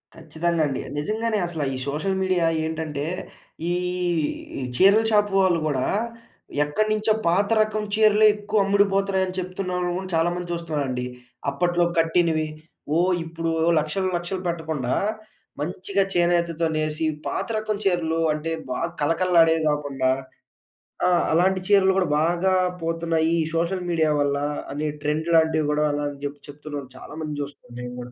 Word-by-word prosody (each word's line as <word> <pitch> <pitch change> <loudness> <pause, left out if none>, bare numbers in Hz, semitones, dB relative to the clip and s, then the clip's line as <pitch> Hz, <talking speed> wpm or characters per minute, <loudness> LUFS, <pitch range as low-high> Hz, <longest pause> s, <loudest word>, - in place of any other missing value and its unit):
ఖచ్చితంగా 170 0 -1
అండి. 135 - -3 0.2
నిజంగానే 215 +8 -1
అసల 165 -3 -3
ఈ - - -4
సోషల్ 190 +7 -1
మీడియా 185 -3 +2 0.2
ఏంటంటే, 155 -2 -3 0.7
ఈ - - +2 0.9
ఈ - - -4
చీరల 200 - +6
షాప్ 210 -1 +3
వాళ్ళు 185 -3 +3
గూడా, 135 -4 0 0.8
ఎక్కడి 150 +9 0
నుంచో 215 0 +2
పాత 190 +4 +3
రకం 215 0 0
చీరలే 215 0 +5
ఎక్కువ 210 0 0
అమ్ముడుపోతున్నాయి 195 -1 +2
అని 185 - -6
చెప్తున్నాము 180 -1 -2
ఆని 190 - -7
చాలా 165 +1 +3
మంది 175 -1 -5
చూస్తున్నారండి. 145 -7 -2 0.4
అప్పట్లో 175 +5 +1
కట్టినవి 165 -1 +2 0.5
ఓ - - +3 0.2
ఇప్పుడు 165 0 -4 0.2
ఓ - - +5
లక్షలు, 170 +5 -1
లక్షలు 175 +2 -4
పెట్టకుండా 160 -7 -2 0.7
మంచిగా 185 +5 0
చేనేతతో 170 -1 +2
నేసి, 155 +1 -1 0.2
పాత - - -2
రకం 215 0 -1
చీరలు 165 -3 +1
అంటే 155 +2 -3 0.2
బాగా 165 +6 -1
కళకళలాడేవి 165 +1 +3
గాకుండా. 140 -3 0 1.0
ఆ! - - +4 0.2
అలాంటి 185 +3 +3
చీరలు 195 -2 +5
గూడా 185 -2 +1
బాగా 175 +3 +2 0.3
పోతున్నాయి. 165 0 +1 0.2
సోషల్ 175 +2 -1
మీడియా 160 -2 +2
వల్ల 140 0 +1 0.4
అనే 150 +2 -2 0.2
ట్రెండ్ 155 +2 -1
లాంటివి 160 -1 +3
గూడా, 150 0 +2
అలా 145 0 -2
అని 140 -1 -10
జెప్పిచెప్తున్నారు. 145 0 -7
చాలా - - -11
మందిని 150 -2 -4
చూస్తున్నా 140 -4 -12
నేను 125 0 -6
గూడా. 125 0 -8
165 Hz, 140 wpm, -24 LUFS, 150-190 Hz, 1.0 s, చీరల